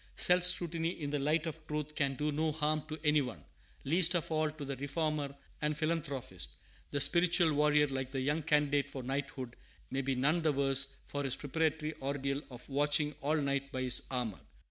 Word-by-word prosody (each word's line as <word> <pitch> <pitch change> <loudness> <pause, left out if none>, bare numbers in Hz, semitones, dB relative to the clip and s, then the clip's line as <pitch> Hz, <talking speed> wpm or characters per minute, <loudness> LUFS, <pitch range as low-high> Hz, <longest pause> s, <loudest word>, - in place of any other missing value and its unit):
Self 180 0 +5
scrutiny 170 -2 +1
in 145 -2 -4
the 145 - 0
light 155 +3 +1
of 160 -1 -7
truth 150 0 -3
can 140 -3 0
do 150 +2 -1
no 155 +2 0
harm 155 0 0
to 155 0 -5
any 150 -1 +4
one, 125 -4 -6 0.4
least 170 +4 +5
of 170 -1 -1
all 155 -1 +1
to 150 -1 -7
the 140 0 -4
reformer 145 0 -2 0.3
and 150 0 0
philanthropist. 150 - -2 0.3
The 145 - -1
spiritual 170 +1 +4
warrior, 150 0 +4
like 130 -2 -3
the 135 -1 -3
young 145 +4 0
candidate 145 -2 +1
for 135 -2 -6
knighthood, 135 -2 -4 0.4
may 135 +1 0
be 135 0 -1
none 150 +7 +2
the 155 -2 +2
worse 135 0 +3
for 145 0 -4
his 135 -1 0
preparatory 155 +1 -1
ordeal 140 0 -2
of 125 -2 -10
watching 145 +2 +2
all 150 +3 +1
night 140 -1 -1
by 130 -1 -3
his 125 -1 +5
armor. 125 -6 -3
145 Hz, 190 wpm, -33 LUFS, 135-155 Hz, 0.4 s, Self